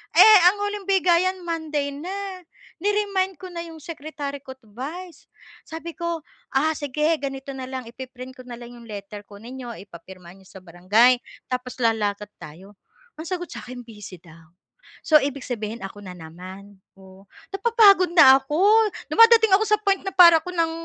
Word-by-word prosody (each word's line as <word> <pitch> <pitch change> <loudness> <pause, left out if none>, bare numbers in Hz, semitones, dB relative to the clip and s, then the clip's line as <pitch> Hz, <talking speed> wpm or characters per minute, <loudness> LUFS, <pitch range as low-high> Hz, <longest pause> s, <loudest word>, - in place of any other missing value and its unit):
eh 430 -2 +8
ang 410 - -10
huling 410 -1 -5
bigayan 370 -1 +2
Monday 310 -4 -3
na, 375 +6 -6 0.4
ni-remind 400 -2 0
ko 370 -1 -10
na 340 - -7
yung 325 -1 -12
secretary 295 -3 -7
ko't 260 0 -12
vice, 315 - -9 0.4
sabi 330 +1 -7
ko, 340 -2 -4 0.5
"Sige, 300 +3 0
ganito 270 0 -6
na 260 -1 -6
lang 260 -1 -6
ipi-print 255 +1 -10
ko 255 - -11
nalang 240 0 -10
yung 235 - -15
letter. 205 0 -9
Kunin 220 +5 -12
ninyo, 240 -2 -8
ipapirma 180 -1 -14
niyo 190 -1 -20
sa 190 - -14
barangay 205 +8 +3 0.3
tapos 250 0 -4
lalakad 210 -2 -1
tayo." 180 +7 -13 0.4
Ang 320 - -7
sagot 355 -2 -4
sa'kin 245 0 -9
busy 210 -5 -11
daw. 165 0 -18 0.5
So, 310 - +6
ibig 280 -1 -4
sabihin, 220 -2 -5
ako 195 +1 -8
na 185 -2 -9
naman, 185 +4 -12 0.2
oo, 190 +1 -17 0.3
napapagod 395 -4 +4
na 270 -6 +8
ako. 295 +4 -4 0.5
Dumadating 455 -2 +6
ako 420 - +2
sa 425 0 +2
point 390 -2 +2
na 385 - -4
para 340 -2 +8
ako 360 - -8
ng 330 -2 0
275 Hz, 160 wpm, -23 LUFS, -, 0.5 s, eh